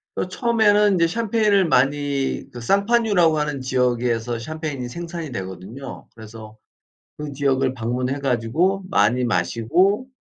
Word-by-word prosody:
어 - - -2
처음에는 210 0 +3
인제 170 -2 +3
샴페인을 210 -1 +2
많이 140 0 0
그 120 - -8
상파뉴라고 200 - +2
하는 150 -2 -2
지역에서 120 -2 0
샴페인이 145 0 -5
생산이 170 +2 -6
되거든요. 95 +6 -8
그래서 110 -1 -12 0.6
그 150 -1 -6
지역을 135 -2 +1
방문해 125 +2 -2
가지고 140 +10 0
많이 120 - +2
마시고 115 - +1
140 Hz, 320 characters per minute, -22 LUFS, 120-180 Hz, 0.6 s, 처음에는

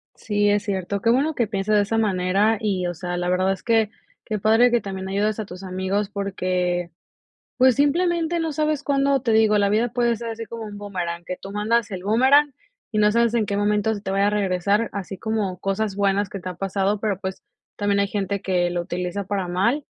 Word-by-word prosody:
Sí, 205 -2 0
es 205 0 +1
cierto. 200 0 -2
Qué 230 - +2
bueno 290 +6 +2
que 235 - +1
pienses 200 0 -1
de 205 - +5
esa 225 +2 -1
manera 200 +1 +2
y, 190 -4 -1
o 175 - -3
sea, 175 +1 -4
la 175 0 -2
verdad 185 +1 +2
es 195 - -6
que 225 -2 +2 0.3
qué 215 - -2
padre 225 +4 +4
que 240 - +2
también 190 -2 -6
ayudes 210 +2 0
a 215 - -4
tus 180 +1 -10
amigos 190 +2 -2
porque, 180 -3 -1 0.7
pues, 255 -1 +5
simplemente 340 +3 +1
no 325 -1 -1
sabes 305 -1 -1
cuándo 275 -1 +2
Te 230 - 0
digo, 220 -1 +4
la 200 -1 +2
vida 220 +4 +2
puede 240 -1 +2
ser 230 +1 -6
así 225 0 -5
como 230 0 -7
un 210 -1 -8
bumerán, 175 -4 -4
que 180 - -5
tú 195 - -9
mandas 215 +2 0
el 185 -2 -5
bumerán, 265 +7 +4 0.4
y 215 - -2
no 210 0 +4
sabes 235 0 +2
en 220 -3 +2
qué 200 - -2
momento 210 +1 +1
se 205 - -6
te 195 - -5
vaya 195 +1 +2
a - - +4
regresar. 200 +2 +1
Así 195 -1 -5
como 215 -4 -2
cosas 195 +1 -1
buenas 200 0 +1
que 195 - -7
te 185 0 -6
ha 180 - -7
pasado, 195 +2 -1
pero, 205 -4 -1
pues, 190 -1 -6 0.3
también 205 -1 +1
hay 200 - +2
gente 200 -1 -2
que 180 -2 +1
lo 175 - -1
utiliza 180 +2 -3
para 195 -2 -2
mal, 230 +12 0
205 Hz, 225 wpm, -23 LUFS, 190-225 Hz, 0.7 s, de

